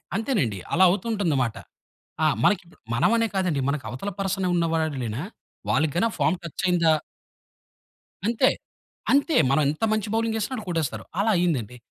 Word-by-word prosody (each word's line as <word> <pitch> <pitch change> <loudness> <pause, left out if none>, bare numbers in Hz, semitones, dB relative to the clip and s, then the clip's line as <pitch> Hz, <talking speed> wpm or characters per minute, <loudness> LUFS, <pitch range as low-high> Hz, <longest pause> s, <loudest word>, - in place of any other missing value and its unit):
అంతేనండి. 195 - 0
అలా 185 - +5
అవుతూ 185 +3 -1
ఉంటుంది 200 -9 0
మాట. 115 -2 -3 0.7
ఆ! - - +6 0.2
మనకి 210 - +4
ఇప్పుడు 170 - -21 0.2
మనం 120 - +3
అనే 230 0 +2
కాదండి, 180 -7 +1
మన‌కి 140 -1 -2
అవతల 130 +11 -4
పర్సన్ 195 -1 -1
ఉన్నవాళ్లేనా 160 -9 -1 0.5
వాళ్ళకి 155 -2 +2
గాని 200 +6 +3
ఆ - - -10
ఫార్మ్ 155 +5 +2
టచ్ 170 +1 -6
అయిందా 170 -3 +4 1.3
అంతే. 235 +4 +3 0.6
అంతే. 285 +2 +3 0.2
మనం 140 +3 +3
ఎంత 155 +8 -4
మంచి 215 -1 -1
బౌలింగ్ 225 0 0
ఎసిన 215 +5 -3
ఆళ్ళు 220 - -6
కొట్టేస్తారు 165 -4 -2 0.2
అలా 215 +2 +3
అయింది 170 -5 +2
అండి. 115 +3 -11
175 Hz, 165 wpm, -25 LUFS, 150-215 Hz, 1.3 s, ఆ